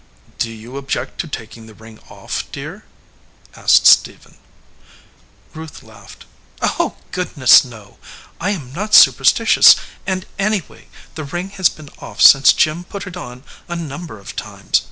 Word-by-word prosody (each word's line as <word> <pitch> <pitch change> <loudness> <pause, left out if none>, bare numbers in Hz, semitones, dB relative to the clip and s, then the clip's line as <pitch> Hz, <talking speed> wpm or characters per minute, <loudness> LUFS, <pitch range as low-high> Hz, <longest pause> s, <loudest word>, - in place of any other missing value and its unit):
"Do 115 - -1
you 115 +4 -11
object 135 -1 -5
to - - -9
taking 115 -5 -9
the 110 - -16
ring 110 0 -16
off, - - -7
dear?" - - -9 0.7
asked - - +3
Stephen. - - +3 1.2
Ruth 160 -1 -11
laughed. 105 -3 -16 0.3
"Oh, - - -2 0.2
goodness, 145 -8 +4
no! 110 -5 -15 0.4
I 185 - -2
am 145 -11 -5
not 210 +6 0
superstitious, - - +6 0.3
and, 185 -1 -3
anyway, 200 -3 -3 0.3
the 155 - -7
ring 175 +7 -6
has 190 -3 +1
been 155 -2 -14
off - - -12
since 140 0 +7
Jim 155 +3 0
put 200 +2 -9
it 185 -2 -9
on 125 -7 -10 0.2
a 175 - -5
number 165 -5 -8
of 100 - -12
times. - - -2
145 Hz, 145 wpm, -17 LUFS, 115-180 Hz, 1.2 s, since